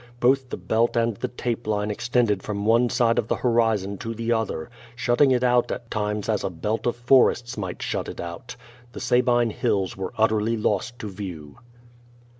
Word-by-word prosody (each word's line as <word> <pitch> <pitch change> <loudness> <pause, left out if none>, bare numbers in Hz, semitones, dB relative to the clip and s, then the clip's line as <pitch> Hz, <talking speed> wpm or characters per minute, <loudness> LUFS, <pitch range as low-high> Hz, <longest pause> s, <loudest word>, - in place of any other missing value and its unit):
Both 130 +1 +2
the - - -4
belt 115 +2 +1
and 115 -1 +1
the - - -2
tape 120 -2 -4
line 105 0 0
extended 115 -2 +1
from 100 0 -4
one 115 +2 +4
side 115 -1 +2
of 110 - -2
the - - +1
horizon 110 -5 +1
to 115 0 -5
the 115 +1 -2
other, 110 -6 -1 0.2
shutting 120 +3 +3
it 125 -1 +2
out 125 -1 +3
at 120 -2 -6
times 105 -1 -2
as 110 -2 0
a - - -1
belt 105 +7 -2
of 120 - +1
forests 120 0 +3
might 95 -4 -5
shut - - -2
it - - -8
out. 85 +8 -7 0.4
The - - -7
Sabine 120 -2 +2
Hills 95 -2 -1
were 95 -1 -5
utterly 110 +1 +2
lost 110 +3 -1
to 110 - -6
view. 85 -7 -8
115 Hz, 190 wpm, -24 LUFS, 105-120 Hz, 0.4 s, one